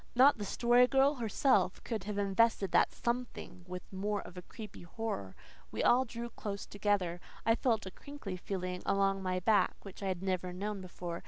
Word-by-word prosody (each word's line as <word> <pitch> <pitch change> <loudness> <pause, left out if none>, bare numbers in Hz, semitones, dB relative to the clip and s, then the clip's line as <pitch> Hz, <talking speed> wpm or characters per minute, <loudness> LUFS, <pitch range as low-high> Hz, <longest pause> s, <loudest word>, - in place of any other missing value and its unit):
Not 260 0 +6
the 205 - -2
Story 240 +4 +4
Girl 270 +2 +4
herself 225 -5 +2
could 220 -5 -3
have 210 -1 -3
invested 200 0 +2
that - - +4
"something" 235 -6 -4
with 180 0 -6
more 205 +2 -1
of 180 - -11
creepy 215 -2 -9
horror. 175 - -4 0.4
We - - -2
all 255 +2 +5
drew 235 0 -6
close 200 -2 -5
together. 200 -4 0 0.2
I 225 - +5
felt 225 -3 +1
a 190 - -6
crinkly 280 -5 -7
feeling 180 -1 -4
along 195 0 +2
my 185 -1 -1
back 215 +2 +3
which 195 0 -10
I 195 - -2
had 185 -1 -2
never 185 -1 -1
known 200 +2 -3
before. 175 -2 -6
200 Hz, 180 wpm, -33 LUFS, 185-230 Hz, 0.4 s, Not